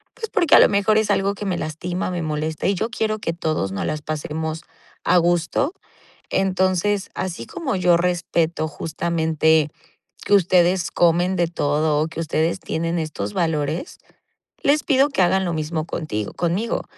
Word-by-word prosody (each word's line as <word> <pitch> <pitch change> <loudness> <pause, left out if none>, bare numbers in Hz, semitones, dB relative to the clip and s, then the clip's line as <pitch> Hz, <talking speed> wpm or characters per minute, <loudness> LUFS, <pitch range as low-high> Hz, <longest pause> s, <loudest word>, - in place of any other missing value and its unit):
Pues 450 - -6
porque, 340 -7 +4
a - - +9
lo - - +7
mejor, 205 +1 +2
es 220 - +1
algo 200 +1 +1
que 205 - -6
me 185 -3 -1
lastima, 175 +4 -3
me 175 -1 -3
molesta 155 0 -3
y 200 - +3
yo 220 +5 -2
quiero 220 -2 -1
que 165 - -2
todos 155 - -2
nos 95 - -3
las 155 - -2
pasemos 155 +1 -4 0.4
a 180 - +4
gusto. 175 - +1 0.6
Entonces, 190 +1 +1
así 185 -2 -4
como 325 - -3
yo 180 -2 +4
respeto 170 -2 0
justamente 160 -1 +1 0.5
que 205 - +3
ustedes 180 -1 +3
comen 175 +2 +2
de 170 -1 +2
todo 150 -2 0
o 160 - -1
que 160 - -11
ustedes 160 +1 0
tienen 165 +1 -2
estos 145 -11 -4
valores, 160 - -2 0.7
les 295 +2 +3
pido 275 +1 +3
que 270 - 0
hagan 190 +2 +2
lo 175 - -1
mismo 155 0 -2
contigo 110 -12 -4
conmigo. 180 +7 -1
170 Hz, 165 wpm, -22 LUFS, 155-190 Hz, 0.7 s, a